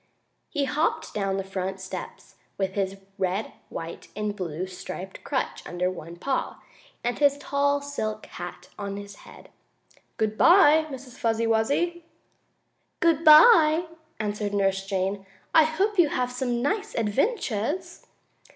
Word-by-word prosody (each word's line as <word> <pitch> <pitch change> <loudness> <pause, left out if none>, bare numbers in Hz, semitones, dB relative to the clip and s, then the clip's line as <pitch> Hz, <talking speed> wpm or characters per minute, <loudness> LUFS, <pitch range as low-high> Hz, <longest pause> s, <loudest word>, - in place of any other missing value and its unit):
He 290 -3 0
hopped 310 +3 -1
down 195 -2 -1
the 195 - -2
front 190 0 -4
steps, 190 0 -8 0.2
with 190 -1 -1
his 195 -1 -2 0.2
red, 190 +3 -1 0.2
white 165 0 -7
and 210 0 -2
blue 175 -2 -4
striped 185 0 -8
crutch 270 - -2
under 180 +1 -1
one 170 -2 -9
paw, 260 +9 -2 0.4
and 240 0 -1
his 285 -1 +4
tall, 285 0 +1
silk 215 -7 -4
hat 175 +1 -9
on 200 -1 -4
his 200 0 -9
head. - - -15 0.7
"Good 215 0 -1
bye, 320 -3 +6
Miss 260 -2 -9
Fuzzy 230 -3 +1
Wuzzy!" 285 +10 +1 1.0
"Good 330 -2 +3
bye!" 315 0 +8 0.3
answered 210 -1 -2
Nurse 195 -1 +1
Jane. 195 0 -1 0.3
"I 320 -1 +7
hope 385 +6 0
you 325 -4 +6
have 250 -2 -1
some 245 -1 -2
nice 415 +8 -1
adventures!" 285 - -1
225 Hz, 135 wpm, -26 LUFS, 195-300 Hz, 1.0 s, bye